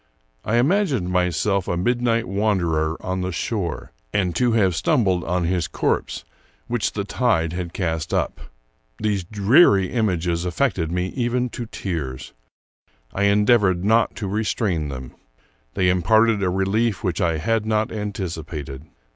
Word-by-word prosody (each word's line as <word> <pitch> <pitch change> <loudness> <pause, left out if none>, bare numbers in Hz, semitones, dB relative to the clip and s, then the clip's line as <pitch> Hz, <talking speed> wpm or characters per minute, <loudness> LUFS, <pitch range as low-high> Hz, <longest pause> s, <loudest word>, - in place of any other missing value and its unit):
I 110 - 0
imagined 135 - +2
myself 90 +2 +1
a 85 - -1
midnight 120 +3 +1
wanderer 85 -6 0
on 95 0 -2
the 90 0 -2
shore, 85 0 -3 0.2
and 90 -4 0
to 120 -2 +2
have 95 -6 +2
stumbled 95 -1 +1
on 90 +1 0
his 85 0 0
corpse, - - -2 0.4
which 120 -2 -1
the 100 - -2
tide 100 -7 0
had 90 -1 -4
cast 80 -4 -2
up. - - -1 0.6
These 105 -3 -1
dreary 100 - +4
images 90 -7 0
affected 90 - -1
me 90 +1 -1
even 125 +1 -1
to 120 0 -6
tears. 70 -12 -5 0.8
I 100 - +1
endeav 105 +4 +4
ored 95 -3 +1
not 110 +3 +2
to 105 - -4
restrain 100 -5 -1
them. 65 -2 -7 0.6
They 95 -2 +2
imparted 110 +4 +3
a 95 - +1
relief 95 +2 0
which 90 +1 -1
I 85 -3 +1
had 110 +5 0
not 110 0 0
anticipated. 80 -9 -5
95 Hz, 145 wpm, -22 LUFS, 85-110 Hz, 0.8 s, dreary